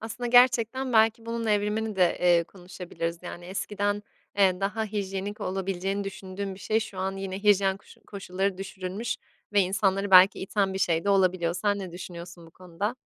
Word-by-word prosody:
Aslında 225 Hz, +2 st, -5 dB
gerçekten 250 Hz, +1 st, +4 dB
belki 225 Hz, 0 st, +3 dB
bunun 230 Hz, 0 st, -3 dB
evrimini 210 Hz, 0 st, 0 dB
de, 180 Hz, -2 st, +3 dB
eee, 175 Hz, -1 st, +4 dB
konuşabiliriz. 175 Hz, -2 st, -6 dB
Yani, 175 Hz, 0 st, -8 dB
eskiden, 205 Hz, +2 st, -2 dB, 0.4 s
eee, 190 Hz, -2 st, +4 dB
daha 210 Hz, +3 st, -1 dB
hijyenik 200 Hz, -1 st, -4 dB
olabileceğini 195 Hz, +1 st, -2 dB
düşündüğüm 195 Hz, 0 st, -6 dB
bir 190 Hz, -, -14 dB
şey 220 Hz, +1 st, +1 dB
şu 195 Hz, -3 st, -7 dB
an 190 Hz, +1 st, -2 dB
yine 195 Hz, 0 st, -5 dB
hijyen 200 Hz, -2 st, +3 dB
koşu 195 Hz, -, -19 dB
koşulları 195 Hz, -1 st, -3 dB
düşürülmüş 195 Hz, +3 st, -4 dB, 0.4 s
ve 205 Hz, -, +5 dB
insanları 195 Hz, +1 st, +1 dB
belki 185 Hz, +1 st, +7 dB
iten 195 Hz, 0 st, -1 dB
bir -, -, -2 dB
şey 165 Hz, -3 st, +1 dB
de 200 Hz, -, +2 dB
olabiliyor. 185 Hz, -3 st, +2 dB
Sen 205 Hz, +3 st, 0 dB
ne 190 Hz, -3 st, -7 dB
düşünüyorsun 175 Hz, -1 st, -9 dB
bu -, -, -16 dB
konuda? 185 Hz, +7 st, -5 dB
195 Hz, 170 wpm, -27 LUFS, 185-210 Hz, 0.4 s, belki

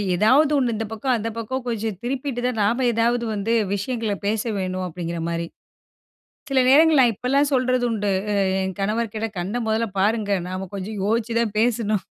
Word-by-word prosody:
ஏதாவது 260 Hz, -, +4 dB
ஒண்ணு 250 Hz, -4 st, +1 dB
இந்த 220 Hz, +1 st, -3 dB
பக்கம், 255 Hz, +4 st, -1 dB
அந்த 225 Hz, +1 st, -3 dB
பக்கம் 255 Hz, +3 st, -3 dB
கொஞ்சம் 220 Hz, -4 st, -2 dB
திருப்பிட்டு 255 Hz, 0 st, -3 dB
தான் 250 Hz, -3 st, -1 dB
நாம 240 Hz, +5 st, +1 dB
ஏதாவது 235 Hz, +1 st, +1 dB
வந்து 210 Hz, +2 st, -1 dB, 0.2 s
விஷயங்கள 220 Hz, +1 st, -2 dB
பேச 210 Hz, +1 st, +1 dB, 0.2 s
வேணும் 185 Hz, -1 st, -2 dB
அப்டிங்கிறமாரி. 170 Hz, -1 st, -4 dB, 1.0 s
சில 270 Hz, -1 st, +3 dB
நேரங்கள்ல 305 Hz, +1 st, +6 dB
நான் 240 Hz, -2 st, +4 dB
இப்பல்லாம் 275 Hz, +6 st, +1 dB
சொல்றது 255 Hz, -1 st, +2 dB
உண்டு. 205 Hz, -2 st, -1 dB, 0.3 s
அ -, -, +3 dB, 0.2 s
என் 190 Hz, 0 st, -3 dB
கணவர்க்கிட்ட 220 Hz, +2 st, -1 dB
கண்ண 190 Hz, +6 st, -3 dB
முதல 220 Hz, +1 st, +1 dB
பாருங்க! 210 Hz, +1 st, +1 dB, 0.2 s
நாம 185 Hz, +1 st, -4 dB
கொஞ்சம் 200 Hz, +2 st, -5 dB
யோசிச்சு 230 Hz, +2 st, 0 dB
தான் 220 Hz, -3 st, -1 dB
பேசணும் 220 Hz, -4 st, +1 dB
225 Hz, 165 wpm, -23 LUFS, 200-245 Hz, 1.0 s, நேரங்கள்ல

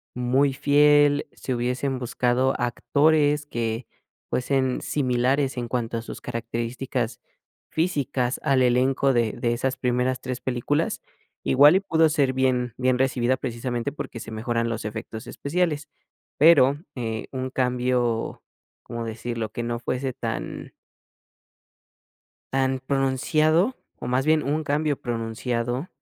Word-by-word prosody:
muy 130 Hz, +3 st, +2 dB
fiel, 145 Hz, +1 st, +4 dB
si 130 Hz, -, -4 dB
hubiesen 125 Hz, +2 st, -1 dB
buscado 125 Hz, +1 st, +1 dB
actores 145 Hz, +4 st, +2 dB
que 115 Hz, -2 st, -3 dB, 0.5 s
fuesen 130 Hz, 0 st, 0 dB
similares 130 Hz, 0 st, +1 dB
en 120 Hz, -1 st, -2 dB
cuanto 115 Hz, -1 st, -2 dB
a 115 Hz, -, -3 dB
sus -, -, -9 dB
características 120 Hz, +1 st, -3 dB, 0.5 s
físicas, 140 Hz, -7 st, -1 dB
al 135 Hz, -3 st, +3 dB
elenco 130 Hz, +2 st, +3 dB
de 115 Hz, -3 st, +1 dB
de 120 Hz, 0 st, -1 dB
esas 130 Hz, +2 st, -1 dB
primeras 125 Hz, 0 st, 0 dB
3 130 Hz, -1 st, -4 dB
películas. 130 Hz, +5 st, -1 dB, 0.4 s
Igual 145 Hz, +5 st, +6 dB
y -, -, +5 dB
pudo 160 Hz, -4 st, +3 dB
ser 140 Hz, -4 st, +2 dB
bien 125 Hz, -3 st, +1 dB
bien 130 Hz, 0 st, +2 dB
recibida 130 Hz, -1 st, +1 dB
precisamente 120 Hz, +2 st, -3 dB
porque 130 Hz, -4 st, -7 dB
se 110 Hz, -, -8 dB
mejoran 115 Hz, +1 st, -1 dB
los 115 Hz, -2 st, -4 dB
efectos 110 Hz, +2 st, -6 dB
especiales, 155 Hz, -1 st, -1 dB, 0.5 s
pero, 145 Hz, -3 st, +6 dB, 0.2 s
eh, 115 Hz, -3 st, -4 dB
un 130 Hz, -1 st, -3 dB
cambio, 125 Hz, -2 st, 0 dB, 0.4 s
¿cómo 115 Hz, 0 st, -5 dB
decirlo?, 115 Hz, 0 st, -4 dB
que -, -, -4 dB
no 120 Hz, 0 st, -2 dB
fuese 130 Hz, +2 st, -2 dB
tan -, -, -5 dB, 1.8 s
tan 130 Hz, -1 st, +1 dB
pronunciado, 155 Hz, -, +2 dB, 0.2 s
o -, -, -6 dB
más 125 Hz, +2 st, +1 dB
bien 155 Hz, 0 st, +3 dB
un 150 Hz, +3 st, -1 dB
cambio 145 Hz, 0 st, 0 dB
pronunciado, 120 Hz, +4 st, -2 dB
130 Hz, 125 wpm, -25 LUFS, 120-140 Hz, 1.8 s, Igual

